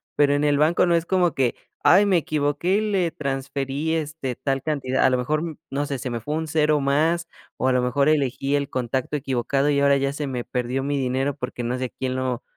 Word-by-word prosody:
pero 145 Hz, -1 st, +4 dB
en 145 Hz, +1 st, +1 dB
el 145 Hz, -1 st, +3 dB
banco 155 Hz, +5 st, +3 dB
no 175 Hz, -1 st, +3 dB
es 165 Hz, 0 st, 0 dB
como 180 Hz, -2 st, +2 dB
que, 130 Hz, -3 st, +1 dB, 0.3 s
ay, 195 Hz, +3 st, +6 dB
me 195 Hz, -3 st, +3 dB
equivoqué 155 Hz, +4 st, 0 dB
y -, -, +1 dB
le 180 Hz, -4 st, +1 dB
transferí, 140 Hz, +2 st, -3 dB
este, 150 Hz, -5 st, -3 dB
tal 135 Hz, +1 st, -2 dB
cantidad, 140 Hz, -4 st, 0 dB
a -, -, +6 dB
lo 130 Hz, -, +2 dB
mejor, 155 Hz, +5 st, -2 dB
no 140 Hz, +2 st, -1 dB
sé, 140 Hz, -1 st, -3 dB
se 125 Hz, -, -4 dB
me 120 Hz, -1 st, -3 dB
fue 145 Hz, +7 st, -4 dB
un 160 Hz, 0 st, -2 dB
0 150 Hz, -1 st, +2 dB
más, 160 Hz, +5 st, +1 dB, 0.3 s
o 130 Hz, -, 0 dB
a -, -, +4 dB
lo 125 Hz, -, +2 dB
mejor 140 Hz, +4 st, +2 dB
elegí 140 Hz, -1 st, +1 dB
el 140 Hz, -1 st, 0 dB
contacto 130 Hz, +2 st, -2 dB
equivocado 135 Hz, +1 st, 0 dB
y 140 Hz, -1 st, +2 dB
ahora 140 Hz, 0 st, +4 dB
ya 140 Hz, 0 st, 0 dB
se 145 Hz, +1 st, -4 dB
me 125 Hz, -2 st, -3 dB
perdió 125 Hz, +2 st, -2 dB
mi 145 Hz, +1 st, -1 dB
dinero 135 Hz, +1 st, -1 dB
porque 125 Hz, -2 st, -5 dB
no 120 Hz, +2 st, -1 dB
sé 130 Hz, -, -2 dB
a -, -, -5 dB
quién 130 Hz, +1 st, -4 dB
lo 130 Hz, -2 st, -2 dB
140 Hz, 240 wpm, -23 LUFS, 130-155 Hz, 0.3 s, ay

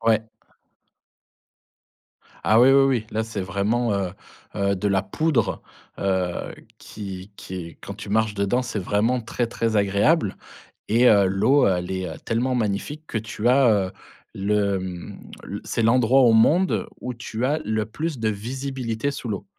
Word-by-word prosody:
Ouais. 110 Hz, -1 st, +2 dB, 2.2 s
Ah, 110 Hz, +2 st, +4 dB
oui, 130 Hz, +2 st, +7 dB
oui, 135 Hz, 0 st, +6 dB
oui. 125 Hz, -5 st, +1 dB
Là, 110 Hz, -, -1 dB
c'est 110 Hz, -2 st, -5 dB
vraiment, 100 Hz, +5 st, 0 dB
heu 95 Hz, -2 st, -1 dB, 0.5 s
heu, 100 Hz, 0 st, +1 dB
de 100 Hz, +2 st, -1 dB
la 95 Hz, -1 st, +2 dB
poudre, 150 Hz, +9 st, 0 dB, 0.4 s
heu, 95 Hz, -2 st, -1 dB, 0.2 s
qui 95 Hz, -2 st, -8 dB
qui 95 Hz, -, -9 dB
est 85 Hz, -3 st, -6 dB
quand 100 Hz, -, -7 dB
tu 105 Hz, +1 st, -9 dB
marches 110 Hz, 0 st, +1 dB
dedans, 100 Hz, +5 st, +1 dB
c'est 120 Hz, -4 st, -4 dB
vraiment 105 Hz, +6 st, +1 dB
très, 120 Hz, +1 st, -2 dB
très 115 Hz, -1 st, -1 dB
agréable 100 Hz, -, +2 dB, 0.5 s
et 120 Hz, +4 st, +4 dB
heu, 100 Hz, -2 st, +5 dB
l'eau, 125 Hz, +9 st, +3 dB
heu, 95 Hz, -, +3 dB
elle 90 Hz, +1 st, -4 dB
est, 95 Hz, -1 st, -2 dB
heu, 80 Hz, -, -7 dB
tellement 120 Hz, +3 st, 0 dB
magnifique 115 Hz, +7 st, -2 dB
que 110 Hz, -, -2 dB
tu 110 Hz, +1 st, -3 dB
as, 130 Hz, +1 st, +5 dB
heu, 100 Hz, -4 st, +1 dB, 0.4 s
le, 100 Hz, 0 st, +1 dB
mmh, 90 Hz, -2 st, -7 dB, 0.3 s
l -, -, -6 dB
c'est -, -, -2 dB
l'endroit 125 Hz, +3 st, +4 dB
au 120 Hz, -3 st, +5 dB
monde 160 Hz, +12 st, +3 dB
où 125 Hz, -, -4 dB
tu 120 Hz, 0 st, -4 dB
as 150 Hz, +4 st, +1 dB
le 110 Hz, -1 st, -1 dB
plus 150 Hz, +6 st, -4 dB
de 110 Hz, -1 st, +1 dB
visibilité 125 Hz, +2 st, -3 dB
sous 125 Hz, -3 st, -6 dB
l'eau. 100 Hz, -1 st, -4 dB
110 Hz, 170 wpm, -23 LUFS, 100-125 Hz, 2.2 s, oui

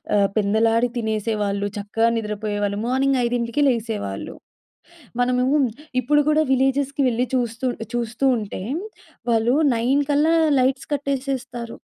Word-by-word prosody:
ఆహ్, 200 Hz, -1 st, +4 dB
పెందలాడి 225 Hz, +3 st, +2 dB
తినేసేవాళ్ళు, 215 Hz, -2 st, -1 dB
చక్కగా 215 Hz, +3 st, 0 dB
నిద్రపోయేవాళ్ళు. 205 Hz, -1 st, -2 dB
మార్నింగ్ 265 Hz, +1 st, +2 dB
5కి 235 Hz, +2 st, -1 dB
లేసేవాళ్ళు. 220 Hz, -, -2 dB, 0.8 s
మనము 250 Hz, 0 st, +2 dB, 0.5 s
ఇప్పుడు 295 Hz, +4 st, +3 dB
కూడా 305 Hz, +1 st, +4 dB
విలేజెస్‌కి 270 Hz, +2 st, +1 dB
వెళ్ళి 245 Hz, +1 st, 0 dB
చూస్తూ 245 Hz, +1 st, -1 dB, 0.3 s
చూస్తూ 235 Hz, +2 st, -2 dB
ఉంటే, 205 Hz, -3 st, -6 dB, 0.7 s
వాళ్ళు 230 Hz, +3 st, +3 dB, 0.2 s
9 260 Hz, +5 st, +2 dB
కల్లా 300 Hz, +3 st, +3 dB, 0.3 s
లైట్స్ 265 Hz, +1 st, 0 dB
కట్టేసేస్తారు. 265 Hz, -4 st, -3 dB
235 Hz, 105 wpm, -22 LUFS, 220-265 Hz, 0.8 s, ఆహ్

